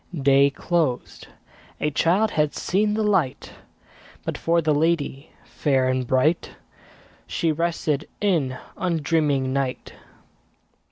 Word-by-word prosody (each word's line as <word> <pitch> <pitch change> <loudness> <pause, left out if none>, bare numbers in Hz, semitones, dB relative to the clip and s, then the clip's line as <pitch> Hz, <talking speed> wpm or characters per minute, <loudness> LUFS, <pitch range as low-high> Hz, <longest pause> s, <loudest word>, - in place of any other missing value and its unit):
Day 140 0 +5
closed; 145 -3 -2 0.5
a 150 - 0
child 190 +9 +2
had 150 -1 0
seen 210 +3 0
the 220 - 0
light; 190 -11 0 0.7
But, - - -2
for 170 +1 +1
the 155 -2 +1
lady 150 -2 0 0.2
fair 135 -3 0
and 130 -1 -1
bright, 140 +7 +1 0.7
She 165 - 0
rested 155 -2 -1
in 155 -11 0 0.2
undreaming 150 -6 0
night. 135 -2 -3
150 Hz, 110 wpm, -23 LUFS, 135-170 Hz, 0.7 s, Day